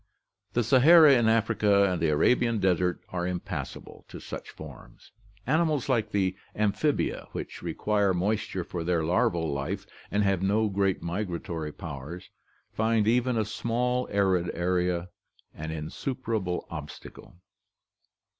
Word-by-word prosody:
The 120 - +2
Sahara 145 +6 +7
in 120 -3 +4
Africa 105 -2 +3
and 90 -2 -1
the 80 - +2
Arabian 115 +10 +3
desert 90 -2 +1
are 90 -1 -2
impassable 90 -1 -6
to - - -9
such - - -8
forms. - - -13 0.3
Animals 155 -1 +1
like 115 -5 +1
the 95 -3 0 0.2
amphibia, 105 +8 0
which - - -6
require 105 -2 0
moisture 95 0 -1
for 85 0 -5
their 85 -1 +1
larval 80 -2 +1
life 70 0 -3 0.2
and 105 +1 +1
have 95 -2 +1
no 105 +3 +2
great 100 -1 0
migratory 85 -4 -4
powers, 80 +4 -8 0.4
find 110 -1 +1
even 125 +1 +2
a 110 - +1
small 125 +3 -1
arid 95 -3 +1
area 90 0 0 0.4
an 80 +1 -6
insuperable 95 - -3
obstacle. 75 +1 -9
100 Hz, 125 wpm, -27 LUFS, 85-115 Hz, 0.4 s, Sahara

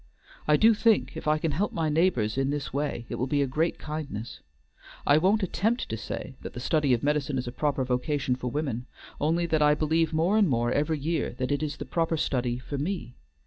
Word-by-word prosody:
I 150 0 +5
do 225 +6 +6
think 220 0 +2
if - - -6
I 155 0 +4
can 155 0 -1
help 190 +9 -1
my 160 -2 0
neighbors 150 -9 +2
in 135 0 +1
this 145 -1 -3
way 140 -4 -2
it - - -4
will 130 - 0
be 145 +1 +2
a - - +1
great 155 +6 0
kindness. 150 -7 -6 0.7
I 145 +1 +5
won't 200 +5 +3
attempt 220 +6 0
to 110 - -2
say 115 +4 -6
that - - -7
the - - -6
study 145 +2 +1
of 115 - -6
medicine 145 -1 0
is 125 -1 -3
a - - -3
proper 140 0 0
vocation 130 +1 0
for 125 0 -4
women, 130 -3 -3 0.3
only 165 +3 +1
that 160 -2 +1
I 150 0 +5
believe 160 +1 +1
more 170 +7 +2
and 200 -6 +4
more 120 -2 +1
every 150 +3 +1
year 160 -2 -1
that 130 +1 -2
it 145 - 0
is 150 -1 -3
the - - -6
proper 165 -1 0
study 125 -4 0
for 135 +3 -5
me. 150 - -3
150 Hz, 225 wpm, -27 LUFS, 130-160 Hz, 0.7 s, do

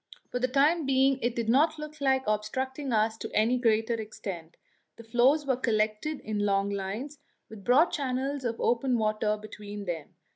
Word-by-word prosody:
For 250 - -1
the 255 - +1
time 285 +4 +2
being 270 0 +3
it 240 0 0
did 230 -2 -2
not 285 +8 +3
look 305 0 -8
like 265 -1 +2
obstructing 260 +6 -2
us 220 0 +1
to - - -5
any 235 +4 +3
great 225 -2 +2
extent; 195 -7 -5 0.4
the 230 - -12
floes 250 +6 +3
were 265 -2 +2
collected 220 +4 -1
in 215 -1 -3
long 200 -1 +1
lines, 210 +9 -4 0.3
with 220 -3 -11
broad 270 - +4
channels 270 0 -2
of 230 -2 -2
open 245 +1 +1
water 215 -1 0
between 210 -1 -8
them. 170 -1 -5
235 Hz, 175 wpm, -28 LUFS, 215-270 Hz, 0.4 s, broad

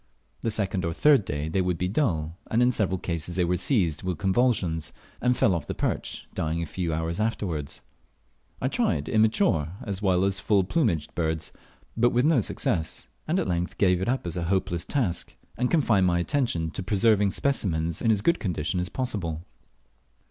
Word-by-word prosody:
The - - 0
second 100 -4 0
or 85 0 -1
third 140 - +4
day 75 -1 -3
they 85 +4 0
would 90 -2 0
be 90 - -1
dull, 85 - 0
and 115 - +1
in 125 - +4
several 100 -6 +1
cases 85 -1 -3
they 90 -1 +2
were 90 +1 +1
seized 90 - +1
with 90 -3 -2
convulsions, 95 -4 +1 0.3
and 125 0 +2
fell 95 - +3
off 85 -4 -3
the - - -4
perch, - - -3
dying 80 +1 -1
a 85 - -2
few 85 +2 -3
hours 80 +3 -2
afterwards. 90 -10 -2 0.8
I - - 0
tried 75 +1 0
immature 110 - +2
as 100 -2 -4
well 95 -2 +2
as 95 -1 0
full 100 0 +2
plumaged 95 - 0
birds, 80 -2 -2 0.4
but 120 +2 +4
with 125 +3 +2
no 160 -2 +4
better - - +4
success, 80 -4 -2 0.2
and 170 +4 +1
at - - -1
length 90 -1 -2
gave 90 -2 +3
it 95 - -1
up 130 -4 -1
as 85 - -4
a 85 -1 -2
hopeless 85 -2 0
task, 105 - -1 0.2
and 125 0 0
confined 115 - +3
my 85 -1 +2
attention 85 - 0
to - - -5
preserving 105 +1 +3
specimens 85 - -1
in 115 - +1
as 105 -3 +3
good 170 +9 +3
a - - -23
condition 90 -2 -1
as 90 +1 -2
possible. 90 -11 -3
95 Hz, 195 wpm, -26 LUFS, 85-110 Hz, 0.8 s, third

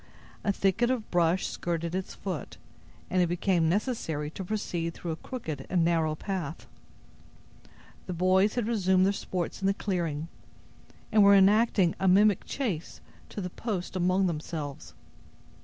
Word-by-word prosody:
A 205 - +2
thicket 200 +5 +1
of 250 -4 -2
brush 175 +1 +2
skirted 170 -1 -3
its 190 0 -4
foot, 180 -8 -5 0.5
and 185 - +3
it 175 - +3
became 175 -1 +1
necessary 165 - -1
to 190 - -6
proceed 175 -4 -3
through 170 - -5
a - - -2
crooked 160 - -6
and 175 -3 +2
narrow 165 -2 +1
path. 175 -3 -4 1.4
The 180 - -3
boys 185 +4 +3
had 240 -3 0
resumed 190 -5 +3
their 200 - +2
sports 185 -1 -4
in 195 - +1
the 195 - +2
clearing, 165 -7 -2 0.8
and 215 - +5
were 200 0 +7
enacting 200 -2 +4
a 190 - +1
mimic 200 +2 +4
chase 205 - -3 0.3
to 205 - -5
the 180 -1 -5
post 195 -5 -4
among 185 +1 +2
themselves. 155 -4 -5
185 Hz, 150 wpm, -28 LUFS, 165-200 Hz, 1.4 s, were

